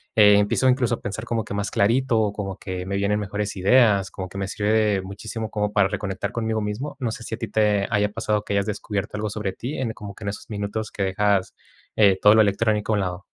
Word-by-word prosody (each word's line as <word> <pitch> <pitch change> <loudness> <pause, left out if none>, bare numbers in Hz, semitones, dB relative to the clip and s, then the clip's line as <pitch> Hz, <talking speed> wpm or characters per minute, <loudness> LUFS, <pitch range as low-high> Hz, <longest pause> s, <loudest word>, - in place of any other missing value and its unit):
eh, 105 -1 +7
empiezo 105 +5 +2
incluso 125 -2 +2
a - - -14
pensar 105 +2 -5
como 115 -1 -2
que - - -6
más 100 0 -2
clarito, 115 -1 +2
como 100 -2 -5
que 95 -1 -5
me 100 +1 -2
vienen 100 +1 +1
mejores 105 0 -3
ideas, 100 -1 +4
como 95 -1 -6
que 95 - -9
me 100 - -2
sirve 105 0 -1
de 105 -3 +2
muchísimo 110 +4 -6
como 105 -1 -1
para 100 -2 +4
reconectar 95 -2 -3
conmigo 110 -1 -1
mismo. 110 +8 -4
No 120 -4 -1
sé 115 - -7
si 115 - -4
a - - -15
ti 115 - -3
te 105 -1 +2
haya 105 -1 +2
pasado, 105 0 -1
que 100 - -4
hayas 100 0 +1
descubierto 105 -1 -3
algo 105 0 -2
sobre 105 -2 -3
ti 125 +9 -5
en 120 -4 -2
como 100 -2 -9
que 110 - -9
en - - -1
esos 100 - -8
minutos 105 +1 -4
que 100 - -3
dejas, 95 0 +1 0.4
eh, 100 -3 +5
todo 105 - +7
lo 110 - +7
electrónico 105 +1 +1
a - - +3
un 105 - +1
lado. 90 +1 -4
105 Hz, 245 wpm, -23 LUFS, 100-110 Hz, 0.4 s, eh